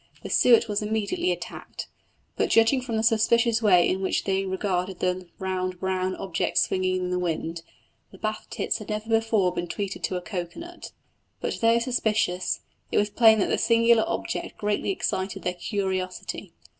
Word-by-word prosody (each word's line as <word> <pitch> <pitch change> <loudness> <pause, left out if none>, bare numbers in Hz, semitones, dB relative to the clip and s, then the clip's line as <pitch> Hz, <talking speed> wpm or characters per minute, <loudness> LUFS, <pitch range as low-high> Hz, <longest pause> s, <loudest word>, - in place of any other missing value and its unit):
The - - -6
suet 235 -2 +5
was 210 -1 -1
immediately 220 - -1
attacked, - - -6 0.5
but - - 0
judging 230 +4 +4
from 235 -3 -3
the 220 - 0
suspicious 230 0 +3
way 180 -5 +5
in 190 - 0
which 190 - 0
they 195 0 0
regarded 190 -1 -2
the 180 0 -1
round 185 -1 -3
brown 185 0 -1
object 180 -4 -2
swinging 185 0 +2
in 180 -1 -2
the 180 - 0
wind, 165 -1 -2 0.5
the 190 - -13
Bath 215 +2 -4
tits - - -2
had 215 - -10
never 215 +1 -3
before 225 -5 +2
been 175 0 -3
treated 200 +3 -4
to 185 - -3
a 180 - -2
cocoa 175 -3 -5
nut. 345 +1 -9 0.5
But - - -3
though 230 0 +5
suspicious, 220 -6 0 0.3
it - - +1
was 210 0 +2
plain 220 0 +6
that - - +1
the - - +1
singular 230 0 +4
object - - -3
greatly 205 -1 -1
excited 190 0 -2
their 180 - -1
curiosity. 185 0 -3
200 Hz, 175 wpm, -26 LUFS, 185-225 Hz, 0.5 s, plain